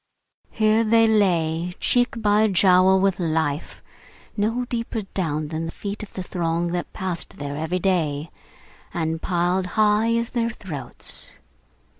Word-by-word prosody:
Here 215 +1 +2
they 225 0 +4
lay, 175 -5 +1
cheek 245 -1 +1
by 210 0 +3
jowl 190 -1 +5
with 195 -1 +1
life: 160 -3 -2 0.5
no 225 +4 0
deeper 230 -2 -3
down 155 -5 -1
than 160 +1 -3
the - - -5
feet 205 +4 -6
of 215 - -9
the 185 - -4
throng 170 -1 -1
that 175 0 -3
passed 180 -2 -4
there 145 0 -5
every 160 +4 -2
day, 165 -5 0 0.6
and 160 -1 -1
piled 180 +1 0
high 215 +2 +3
as 230 0 -1
their 235 -1 0
throats. 180 -11 -4
185 Hz, 140 wpm, -23 LUFS, 165-215 Hz, 0.6 s, jowl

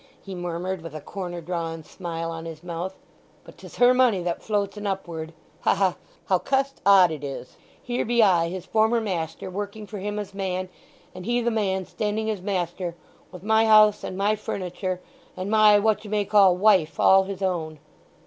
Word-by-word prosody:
he 195 - -9
murmured 175 +1 -4
with 165 -2 -9
a - - -4
corner 175 +2 -6
drawn 165 -1 -4
smile 165 -1 -5
on 165 0 -7
his 165 0 -8
mouth. 180 +2 -5 0.5
"But - - -14
'tis - - -12
her 245 0 +5
money 245 -8 +3
that 170 -1 -2
floats 205 -2 -1
en 210 0 -5
upward. 170 -5 -4 0.3
Ha - - +2
ha—how 190 -1 -1
cust 275 +3 -1
odd 190 -4 +7
it 155 -2 -6
is! 135 -2 -7 0.2
Here 245 0 -2
be 235 0 +3
I, 175 -4 +3
his 185 0 -6
former 220 +2 +2
master, 175 -6 -4
working 205 +2 -5
for 205 -1 -7
him 205 +2 -4
as 205 -1 -5
man, 185 -1 -3 0.4
and 185 +2 -9
he 240 0 +2
the 235 0 0
man 190 -4 -1
standing 220 +2 -2
as 205 -4 -5
master, 180 -2 -3 0.4
with 180 -1 -11
my 220 +1 +3
house 215 -1 +6
and 185 - -5
my 205 +2 +2
furniture 185 -2 -4 0.4
and 185 +3 -4
my 215 -1 +6
what 215 0 +1
you 210 - -9
may 210 -1 0
call 195 -3 +5
wife 190 -5 +3
all 190 0 +6
his 195 0 -6
own." 165 -4 -2
190 Hz, 190 wpm, -25 LUFS, 175-210 Hz, 0.5 s, odd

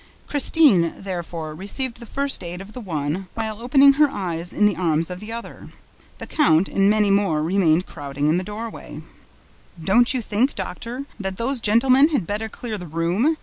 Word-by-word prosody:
Christine, 275 - +3
therefore, 170 -4 -5
received 230 - -3
the 235 - -10
first 275 0 -1
aid 175 +1 -5
of 195 +3 -11
the 255 - -7
one, 165 -1 -3
while 220 -1 -4
opening 275 +3 +6
her 295 +1 +4
eyes 175 -7 -4
in 210 - +2
the 210 - +3
arms 165 -1 0
of 180 - -6
the 210 +2 -8
other. 235 +1 -8 0.5
The - - -7
count 180 - +2
and 195 0 +2
many 210 -1 +3
more 195 -7 +1
remained 175 0 +2
crowding 145 -1 -4
in 155 +3 +3
the - - -4
doorway. 220 +4 -8 0.8
"Don't 215 +9 +3
you 255 -3 -1
think, 225 +7 0
Doctor, 230 +8 -6
that 190 -1 -4
those 255 +3 -1
gentlemen 255 +6 +5
had 285 - -1
better 210 +4 -3
clear 220 -2 -6
the 180 - -8
room?" 175 - 0
205 Hz, 185 wpm, -22 LUFS, 175-240 Hz, 0.8 s, opening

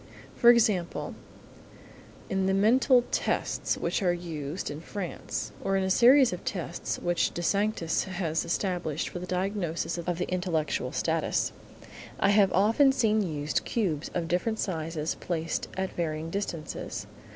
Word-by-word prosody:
For 240 - +6
example, 215 -7 +2 1.1
in 190 0 0
the 190 - +2
mental 245 +5 +4
tests - - 0
which - - -1
are 180 -2 +3
used 165 -2 -4
in 145 +2 -7
France, 110 - -5
or 195 0 +1
in 190 - +1
a 190 - 0
series 250 +2 +6
of 180 - -6
tests 175 -2 -3
which 175 0 0
De 175 - -3
Sanctis 200 -2 +1
has 175 -4 -1
established 170 -3 -2
for 180 - -6
the 180 - -7
diagnosis 180 -2 -2
of 170 0 -2
the 180 - -2
intellectual 180 -4 -1
status, - - 0 0.7
I - - +3
have 200 -2 +5
often 225 +8 +4
seen 220 -5 +2
used 150 -5 -1
cubes 170 -10 -1
of 170 -2 -1
different 180 +6 0
sizes 160 -4 -2
placed 165 -2 -3
at 190 0 -2
varying 160 -1 -3
distances. 175 -5 -4
180 Hz, 145 wpm, -28 LUFS, 165-200 Hz, 1.1 s, For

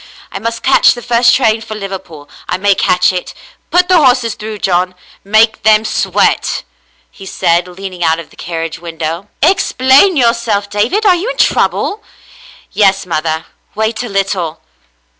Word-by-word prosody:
I - - -5
must 230 +1 -4
catch 270 - +4
the 240 - -9
first 240 0 +3
train 220 -4 +1
for 220 -1 -7
Liverpool 190 -7 -8
— - - -22
I - - 0
may 200 +1 +3
catch 180 -1 +2
it. 180 - -5 0.3
Put 355 +1 +3
the 355 -4 +4
horses 245 -4 +2
through, 215 0 -7
John. 180 -1 0 0.3
Make 220 +2 +2
them 215 0 +3
sweat,'* - - 0 0.5
he 195 - -12
said, 170 0 0
lean 190 +1 -8
ing 175 -1 -5
out 160 0 +2
of 165 - -10
the - - -19
carriage 165 -1 -5
window. 165 +2 -5
*' - - -7
Explain 285 0 +3
yourself, 230 -5 0
David. 235 - 0
Are 385 - +6
you 360 +7 -2
in - - -5
trouble 420 - +1
.f*" - - -30 0.6
*'Yes, 195 -1 +2
mother. 160 -1 -2 0.3
Wait 220 +2 -1
a 245 - -5
little." 195 -5 -2
205 Hz, 175 wpm, -13 LUFS, 180-235 Hz, 0.6 s, Are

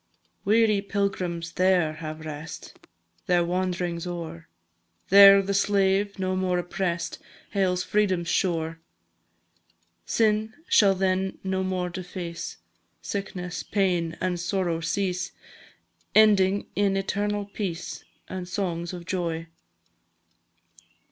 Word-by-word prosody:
Weary 215 0 +4
pilgrims 185 -4 -2
there 180 -4 +2
have 155 0 -7
rest, 155 +1 -8 0.5
Their 175 -1 +4
wand'rings 180 -1 -2
o'er; 165 - -6 0.6
There 195 0 +9
the 200 +1 -1
slave, 200 0 +2
no 185 -1 -1
more 185 -1 +1
oppress'd, 175 -1 -2 0.3
Hails 185 -2 +1
Freedom's 190 -5 +1
shore. 165 -2 0 1.3
Sin 220 0 +1
shall 195 -2 +5
then 190 0 0
no 190 0 -1
more 185 -1 -2
deface, 175 -1 -6 0.5
Sickness, 180 -3 -4
pain, 175 -5 0
and 180 -1 -1
sorrow 175 -1 -1
cease, 180 +1 -2 0.8
Ending 200 -2 +5
in 200 -1 +2
eternal 205 +1 -1
peace, 185 -4 -5 0.2
And 185 -1 -5
songs 175 -3 -2
of 175 -1 -7
joy! 165 -3 -3
185 Hz, 100 wpm, -26 LUFS, 170-195 Hz, 1.3 s, There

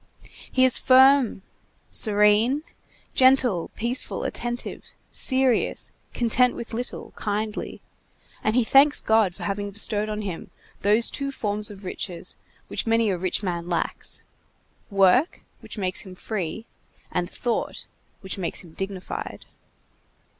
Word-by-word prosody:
He 260 0 +4
is 260 - +6
firm, 260 -5 +5 0.5
serene, 215 +6 +3 0.5
gentle, 255 -9 +3
peaceful, 240 +3 0
attentive, 240 0 -5 0.2
serious, 260 -3 +2 0.2
content 245 +1 +2
with 235 - -6
little, 245 +2 -5
kindly; 210 +1 -3 0.6
and 215 - +1
he 250 - +4
thanks 275 +5 +5
God 220 -5 +2
for - - -9
having 205 0 -2
bestowed 210 +1 0
on 215 0 -3
him 185 -5 -6 0.3
those 210 +3 +3
two 275 -1 -2
forms 210 -4 -2
of 200 -1 -11
riches 180 -1 -4 0.3
which - - -3
many 225 -2 +3
a 185 - -1
rich 185 +3 -1
man 175 -2 -3
lacks: 170 - -3 0.7
work, 200 - +3 0.2
which - - -9
makes 185 -3 0
him 185 -2 -8
free; 210 +1 -4 0.5
and 175 -1 -1
thought, 240 -2 -3 0.4
which 190 0 -6
makes 175 - -2
him 165 -3 -15
dignified. 195 0 -6
215 Hz, 125 wpm, -24 LUFS, 195-245 Hz, 0.7 s, is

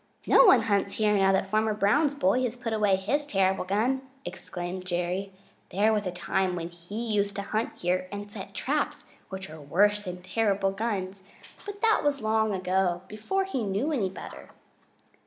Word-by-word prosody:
"No - - +7
one 245 - +7
hunts 200 -2 +1
here 210 -1 +2
now 195 -1 +4
that 190 0 +2
Farmer 215 +2 +1
Brown's 275 +9 +2
boy 240 -1 +2
has 245 -2 -1
put 235 -2 -3
away 210 -3 +3
his 270 +11 0
terrible 190 -4 +1
gun," 225 +8 +1 0.2
explained 180 0 -6
Jerry. 180 +2 -2 0.4
"There 210 +4 +2
was 210 -2 0
a - - -2
time 185 +1 -1
when 170 -1 -4
he 175 +7 -6
used 200 -1 0
to 200 - -3
hunt 215 +3 -2
here 185 +1 -1
and 205 0 -6
set 200 -2 -9
traps, 290 +2 -1 0.2
which 190 0 -6
are 155 -1 -10
worse 205 +8 +2
than 180 -1 -6
terrible 195 0 +1
guns, 195 -2 -3 0.4
but 410 0 -7
that 445 -1 +4
was 290 -1 +1
long 220 -1 +1
ago, 185 -1 0
before 220 - -2
he 385 -10 -3
knew 210 +9 -1
any 220 -11 0
better." 190 - -10
200 Hz, 180 wpm, -27 LUFS, 185-220 Hz, 0.4 s, No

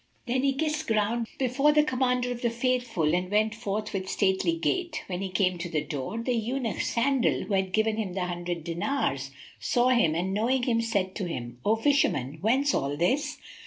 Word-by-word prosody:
Then 255 +1 0
he 275 0 +2
kissed 305 +2 -1
ground 225 +1 +1
before 275 +3 +3
the 300 0 +5
Commander 250 -3 0
of 245 -1 -5
the 235 - +2
Faithful 235 -9 0
and 180 +1 0
went 215 +1 +2
forth 215 -2 -3
with 190 -1 -3
stately 190 -3 +1
gait. 330 - -1
When 180 -1 -4
he 195 - -3
came 185 -1 +1
to 175 +1 -4
the 155 -2 -1
door, 145 +7 -4
the 235 +2 -1
Eunuch 235 -2 -1
Sandal, 260 +1 +1
who 210 - -4
had 190 -1 +1
given 220 +2 +1
him 205 -5 -2
the 185 -1 -1
hundred 175 -1 -4
dinars, 165 - -1 0.3
saw 245 +1 +2
him 235 -11 +3
and 185 +3 -1
knowing 245 +5 +1
him, 230 -2 +2
said 200 -5 -1
to 200 - -2
him, 120 -6 -6
"O 215 - +3
Fisherman, 190 - +1
whence 265 +8 +2
all 140 +1 -1
this?" 275 - 0
220 Hz, 200 wpm, -27 LUFS, 180-250 Hz, 0.3 s, the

